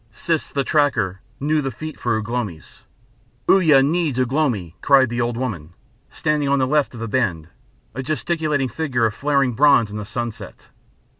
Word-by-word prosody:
Siss 155 Hz, +4 st, -2 dB
the 140 Hz, -, 0 dB
Tracker 115 Hz, -, +1 dB, 0.2 s
knew 150 Hz, +2 st, +1 dB
the 135 Hz, -, -2 dB
feet 155 Hz, +5 st, -8 dB
for 120 Hz, -2 st, 0 dB
Ugh 110 Hz, -1 st, -5 dB
lomi's. 115 Hz, -9 st, -5 dB, 0.7 s
"Uya 155 Hz, -8 st, +5 dB
needs 150 Hz, -3 st, 0 dB
Ugh 130 Hz, -1 st, 0 dB
lomi," 110 Hz, -, 0 dB
cried 135 Hz, -3 st, +5 dB
the 120 Hz, +1 st, -2 dB
old 120 Hz, 0 st, -1 dB
woman, 90 Hz, -11 st, -4 dB, 0.4 s
standing 150 Hz, -2 st, -1 dB
on 140 Hz, -, +3 dB
the 130 Hz, -, +2 dB
left 145 Hz, -1 st, +1 dB
of -, -, -8 dB
the 115 Hz, -, -4 dB
bend, 95 Hz, -10 st, -1 dB, 0.4 s
a 130 Hz, -, -4 dB
gesticulating 150 Hz, 0 st, -1 dB
figure 130 Hz, -2 st, -1 dB
of 110 Hz, -, 0 dB
flaring 140 Hz, -1 st, +1 dB
bronze 135 Hz, -4 st, +4 dB
in 105 Hz, -, -5 dB
the 105 Hz, -, -4 dB
sunset. 120 Hz, +1 st, -6 dB
130 Hz, 175 wpm, -21 LUFS, 115-145 Hz, 0.7 s, Uya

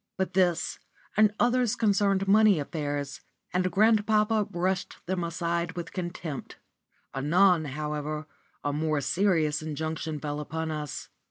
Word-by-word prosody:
But 190 Hz, 0 st, -1 dB
this 175 Hz, -2 st, +1 dB, 0.4 s
and 215 Hz, -1 st, +5 dB
others 245 Hz, -2 st, +3 dB
concerned 200 Hz, -3 st, +2 dB
money 210 Hz, -3 st, +6 dB
affairs, 145 Hz, -2 st, -3 dB, 0.3 s
and 185 Hz, 0 st, +1 dB
grandpapa 215 Hz, +1 st, +3 dB
brushed 185 Hz, +2 st, -1 dB
them 180 Hz, 0 st, -1 dB
away 170 Hz, 0 st, -1 dB
with 175 Hz, -1 st, -6 dB
contempt. 175 Hz, -5 st, -5 dB, 0.6 s
Anon, 165 Hz, +5 st, +3 dB
however, 150 Hz, +1 st, -3 dB, 0.4 s
a 145 Hz, -, -1 dB
more 155 Hz, 0 st, 0 dB
serious 160 Hz, -3 st, +1 dB
injunction 155 Hz, 0 st, -3 dB
fell 145 Hz, 0 st, -3 dB
upon 160 Hz, +2 st, -3 dB
us. 150 Hz, -6 st, -5 dB
170 Hz, 120 wpm, -28 LUFS, 150-195 Hz, 0.6 s, money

